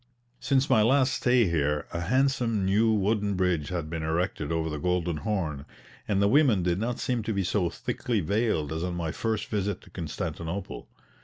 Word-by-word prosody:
Since 135 0 +2
my 120 -5 +4
last 130 +3 +3
stay 125 -2 +3
here 75 -3 0
a 85 - -2
handsome 120 +1 +1
new 105 +4 +3
wooden 105 -1 +1
bridge 90 -5 0
had 85 -4 -3
been 80 0 -4
erected 80 -1 -1
over 80 -1 0
the 75 -2 -4
Golden 90 -1 0
Horn, 80 -7 -2 0.4
and 100 -2 +1
the 100 - +4
women 120 - +4
did 90 +1 0
not 120 +3 -2
seem 125 -2 -1
to 110 +1 -2
be 100 -1 0
so 90 -1 0
thickly 115 +5 -2
veiled 100 -4 0
as 80 +1 -3
on 90 -1 -2
my 85 -2 -2
first 110 +2 -2
visit 100 -3 -2
to - - -18
Constantinople. 85 +2 -5
95 Hz, 185 wpm, -27 LUFS, 85-110 Hz, 0.4 s, my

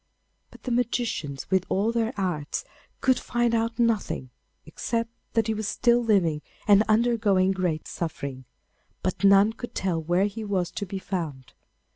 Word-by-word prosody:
But - - -17
the 250 - -3
magicians, 235 - -1
with 190 -1 +3
all 205 +4 +1
their 230 -1 0
arts, 175 - -2 0.4
could 260 -2 +3
find 240 -1 0
out 230 0 0
nothing, 220 - 0 0.3
except 230 +8 -2 0.2
that 225 -2 +2
he 220 - 0
was 215 -1 -3
still 240 +1 +3
living 175 -9 +2 0.3
and 205 -1 +7
undergoing 215 -4 +3
great 180 -5 -1
suffering; 140 -6 -5 0.6
but 185 +2 -2
none 200 +2 +6
could 240 +1 -8
tell 180 -4 0
where 175 +4 +2
he 210 +2 -4
was 190 -4 -1
to 200 - -4
be 195 - -4
found. 155 -9 -5
200 Hz, 155 wpm, -26 LUFS, 175-230 Hz, 0.6 s, and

